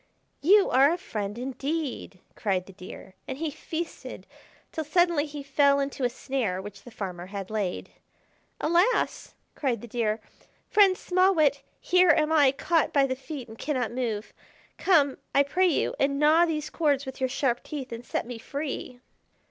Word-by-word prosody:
"You 395 +6 +5
are 275 +3 +5
a 345 - 0
friend 210 - -5
indeed!" 270 - -4 0.2
cried 190 -4 -1
the 195 - -13
Deer, 185 +1 -11
and 265 - -5
he 315 0 -2
feasted 325 +4 -6 0.5
till 315 - -3
suddenly 325 -1 +2
he 290 -1 -7
fell 280 0 +3
into 275 -1 -3
a 245 - +3
snare 240 -7 -2
which 205 +1 -9
the - - -12
farmer 185 -5 -6
had 195 0 -6
laid. 205 -4 -3 0.7
"Alas!" 350 +9 +1 0.2
cried 255 -6 -1
the 240 - -9
Deer, 225 -1 -1 0.5
"Friend 395 -3 +5
Small 370 +1 +2
Wit, 285 -3 +3 0.2
here 360 0 +4
am 310 -1 +4
I 290 -4 +5
caught 325 +4 +1
by 280 -1 +4
the 260 -1 -2
feet, 270 -1 -8
and 225 0 -12
cannot 255 -6 -1
move. 230 -4 -3 0.5
Come, 295 -8 +3 0.2
I 280 - +6
pray 365 +7 +2
you, 330 - +1
and 280 0 +1
gnaw 310 +4 +5
these 305 -2 -3
cords 290 -4 +1
with 265 0 -8
your 260 -1 0
sharp 250 -2 0
teeth 275 -5 -7
and 230 +1 -6
set - - -3
me 240 -1 -7
free!" 265 -2 -5
275 Hz, 170 wpm, -27 LUFS, 240-315 Hz, 0.7 s, I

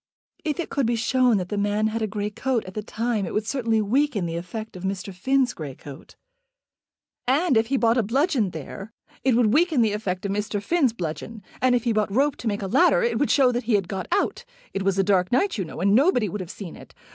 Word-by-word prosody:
"If 310 +1 -2
it 345 - -3
could 275 -4 +1
be 235 - +1
shown 245 0 +2
that 180 -1 -3
the 205 - -2
man 205 +1 +1
had 220 +1 -1
a 220 - 0
grey 210 0 -3
coat 250 +2 -1
at 185 - -9
that 210 +1 -6
time 230 -2 -1
it - - -5
would 215 - 0
certainly 225 -3 0
weaken 245 -2 +1
the 165 0 -3
effect 215 +6 -6
of 180 - -8
Mr. 190 0 -4
Finn's 260 +7 +1
grey 145 -5 -7
coat." 140 -1 -12 1.1
"And 285 +3 +3
if 220 0 +3
he 270 +2 +1
bought 235 0 +3
a - - +4
bludgeon 255 - +1
there, 180 +7 -8 0.3
it 260 -3 +3
would 230 -3 +3
weaken 315 -4 +3
the 215 -2 +1
effect 195 -3 -3
of 200 - -1
Mr. 210 +1 -2
Finn's 275 +4 +2
bludgeon. 205 +3 -6 0.2
And 255 -1 +4
if 240 - 0
he 235 - +1
bought 210 -2 0
rope 275 +6 +2
to 235 - -5
make 205 -1 -1
a - - -2
ladder 350 - +4
it 475 - 0
would 290 - +1
show 265 -3 +4
that 245 -1 -3
he 225 -2 +2
had 195 -3 0
got 190 0 -4
out. - - 0 0.3
It 195 - -2
was 195 0 +1
a 195 - +3
dark 185 -2 +2
night, 375 - +1
you 190 - -1
know, - - -9
and 200 +1 +3
nobody 250 - +4
would 205 +2 -4
have 180 - -7
seen 190 -5 -8
it. - - -15
220 Hz, 250 wpm, -24 LUFS, 195-255 Hz, 1.1 s, a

